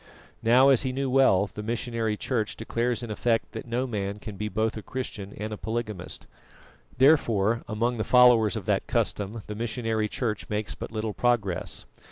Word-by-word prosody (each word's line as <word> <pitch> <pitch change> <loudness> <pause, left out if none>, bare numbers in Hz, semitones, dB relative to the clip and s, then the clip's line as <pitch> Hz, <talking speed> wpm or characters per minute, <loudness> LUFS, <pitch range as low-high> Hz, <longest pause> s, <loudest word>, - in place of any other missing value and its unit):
Now, 125 +4 +6
as 135 -4 +5
he 130 - -1
knew 135 0 -2
well, 105 -7 +4
the 105 - -5
missionary 115 -1 -2
Church 110 -4 -2
declares 120 +2 -2
in 115 - -5
effect 115 +1 0
that 115 +1 -7
no 120 +2 -1
man 100 -4 -3
can 105 -1 -8
be 105 +2 -3
both 110 +1 0
a 110 - -5
Christian 105 -4 -5
and 110 +1 -4
a - - -5
polygamist; 110 -5 -5 0.7
therefore 115 -6 +4
among 120 +3 -1
the 110 - 0
followers 120 -5 +5
of - - -4
that - - 0
custom 105 +2 -1
the 105 - -6
missionary 110 -1 -1
Church 110 -1 -3
makes 105 0 -2
but - - -7
little 110 -1 -3
progress. 110 -8 0
115 Hz, 180 wpm, -27 LUFS, 105-120 Hz, 0.7 s, Now